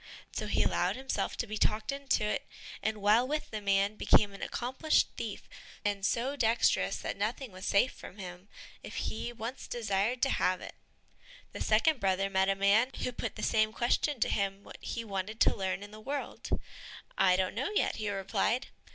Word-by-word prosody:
So - - -3
he - - +2
allowed - - +1
himself 265 0 -2
to - - -1
be 215 0 -5
talked 215 +2 +1
into 275 -5 0
it, 210 - -1 0.3
and 215 -2 -2
while 220 +5 +5
with 305 +2 -2
the 215 -1 -4
man 200 +1 +2
became 205 -1 +4
an 195 - -10
accomplished 260 +6 +1
thief, - - -5 0.4
and 200 -1 0
so 245 +7 +1
dexterous 235 -3 +2
that - - -4
nothing 265 -5 -2
was 185 0 -7
safe 200 +6 +4
from 190 - -11
him, 180 -1 -8 0.3
if - - -9
he 230 +2 -3
once 235 +2 -6
desired 225 +1 0
to 270 - +3
have 185 0 +2
it. - - -8 0.8
The - - -7
second 250 +7 +3
brother 195 0 +1
met 190 0 +3
a 195 - +3
man 200 +5 +4
who 250 - 0
put 240 - -4
the - - -6
same 215 -1 +3
question 245 +4 +1
to - - +3
him 195 0 -1
what - - -11
he 230 - -4
wanted 200 +2 -4
to - - +5
learn 190 -1 -2
in 205 - -10
the 215 - -10
world. 280 +5 -4 0.7
"I 185 -1 +5
don't 185 0 0
know 255 - -1
yet," - - +2
he 215 -1 -2
replied. 205 +5 0
215 Hz, 195 wpm, -31 LUFS, 195-245 Hz, 0.8 s, while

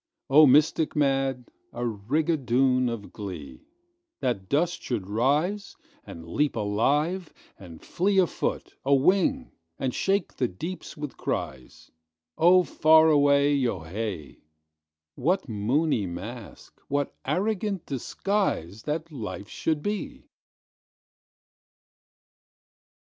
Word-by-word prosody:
Oh, 150 +2 +8
mystic 150 +3 +3
mad, 135 -3 0 0.2
a 120 - -5
rigadoon 130 +2 +1
of 115 -3 -7
glee, 95 - -8 0.5
That 120 -9 -2
dust 170 +5 0
should 110 -7 -3
rise, 145 - 0 0.3
and 80 0 -10
leap 145 - 0
alive, 145 - 0 0.3
and 85 -4 -11
fleeA 190 +1 +2
foot, - - -3
a 140 +1 +4
wing, 200 - +2 0.3
and 130 -2 -2
shake 195 -2 0
the 125 - +1
deeps 165 - -7
with 150 -2 -6
cries—Oh, 80 - -1
far 160 -1 +5
away—yo 140 - +3
hay! 90 -2 -5 0.7
What 180 - 0
moony 115 - 0
masque, 105 +6 -9
what 145 0 -2
arrogant 195 +4 -1
disguiseThat 150 - -2
life 110 -6 -6
should 155 -2 -2
be! 270 +7 -4
135 Hz, 95 wpm, -26 LUFS, 105-160 Hz, 0.7 s, Oh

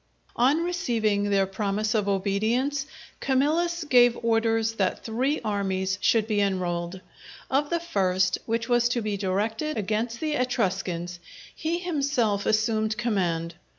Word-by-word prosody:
_" - - -27
On 275 +7 +3
receiving 225 - 0
their 195 -1 +3
promise 200 +2 -1
of 210 -3 +1
obedience, 220 +9 0 0.3
Camillus 320 +6 +1
gave 245 -4 +5
orders 225 -1 +2
that 190 -2 0
three 255 +7 0
armies 190 -2 -1
should 225 -2 +3
be 210 -2 0
enrolled. 180 -2 -2 0.5
Of 285 +2 +1
the 340 - 0
first, 190 - +1
which 230 0 -1
was 240 -1 +3
to 240 -2 -1
be 210 -1 -1
directed 215 +9 -1
against 220 +3 -2
the 310 -1 -1
Etruscans, 190 -9 -1 0.4
he 325 +2 -1
himself 280 - 0
assumed 215 0 +1
command. 175 -8 -1
220 Hz, 135 wpm, -26 LUFS, 195-255 Hz, 0.5 s, gave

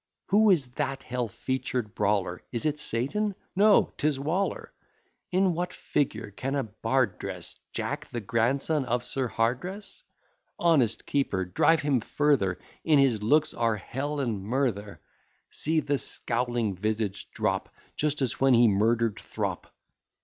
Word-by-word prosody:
Who 215 +2 +5
is 170 -8 +5
that 135 -1 -2
hell 125 -1 -2
featured 120 -1 -3
brawler? 100 -4 0
Is 120 +2 -3
it 150 -1 0
Satan? 190 - -1 0.2
No; 205 +2 +5
'tis 145 -2 +1
Waller. 170 +8 -2 0.6
In 185 0 +3
what 180 +2 -2
figure 110 -7 -2
can 135 +7 -3
a 140 - 0
bard 110 -1 -1
dress - - -5
Jack - - -3
the 120 - -4
grandson 135 +8 +1
of 120 0 -1
Sir 130 0 -1
Hardress? 130 - -2 0.6
Honest 135 -10 +2
keeper, 100 -10 0
drive 150 - +3
him 140 -3 +2
further, 120 -9 +1 0.3
In 155 -2 +4
his 130 -6 +3
looks 150 +8 +3
are 115 -2 +1
Hell 140 +8 -4
and 115 -7 -1
murther; 105 - -1 0.5
See 160 +1 +1
the 145 -1 0
scowling 120 -3 +1
visage 105 0 -2
drop, - - -1 0.3
Just 150 -2 0
as 125 - -1
when 135 -2 +5
he 120 0 +6
murder'd 110 +2 +2
Throp. - - -4
125 Hz, 140 wpm, -27 LUFS, 110-150 Hz, 0.6 s, he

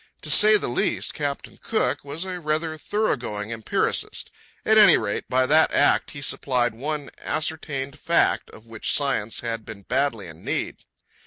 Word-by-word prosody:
To - - -2
say 215 0 +7
the - - -3
least, 115 -4 -1
Captain 145 -2 -5
Cook 220 -9 0
was 145 +6 -4
a 185 -1 -5
rather 155 0 -1
thorough 210 +7 -1
going 105 -2 -6
empiricist. 110 -2 -1 0.3
At 220 0 +5
any 210 - +8
rate, 100 - -3
by 130 0 +2
that 155 +4 +4
act - - +3
he 140 -2 -8
supplied 125 -4 0
one 145 +4 -5
ascertained 150 -3 -3
fact 170 - +1
of 110 - -15
which 115 -1 -3
science 135 -7 -1
had 115 -1 -4
been 110 -4 -10
badly 125 -3 -1
in 80 -2 -12
need. - - -4
140 Hz, 165 wpm, -24 LUFS, 115-155 Hz, 0.3 s, any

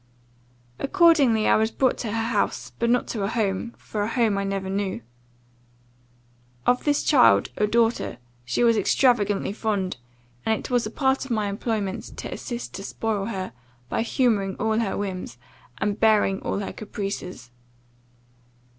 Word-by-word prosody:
Accordingly 285 - +4
I - - +5
was 220 +1 +2
brought 260 +2 +1
to 225 - -3
her 225 +1 -1
house; - - -1
but 235 - +1
not 245 0 +3
to 220 - -3
a 195 - 0
home 220 0 -1
for 210 - -5
a 205 - 0
home 230 -4 +2
I - - -1
never 195 -1 -2
knew. 190 - -2 1.6
Of 250 0 +2
this 290 -1 +2
child, 245 - +5
a 210 - +1
daughter, 230 - +1 0.3
she 120 - 0
was 230 -1 +4
extravagantly 205 -2 +2
fond; 205 - -2 0.5
and 220 0 +1
it - - -8
was 245 -3 +2
a - - -5
part 265 +3 +1
of 270 - -9
my 215 -3 0
employment, 200 -1 -3
to - - -5
assist 240 -1 -6
to 195 - -6
spoil 210 -1 -2
her, 190 -4 -4 0.4
by - - 0
humouring 225 -5 +1
all 220 0 0
her 215 -4 -1
whims, 185 -11 -4 0.4
and 205 +5 -1
bearing 210 -3 +3
all - - -2
her 200 - -4
caprices. 195 - -6
215 Hz, 160 wpm, -24 LUFS, 195-235 Hz, 1.6 s, I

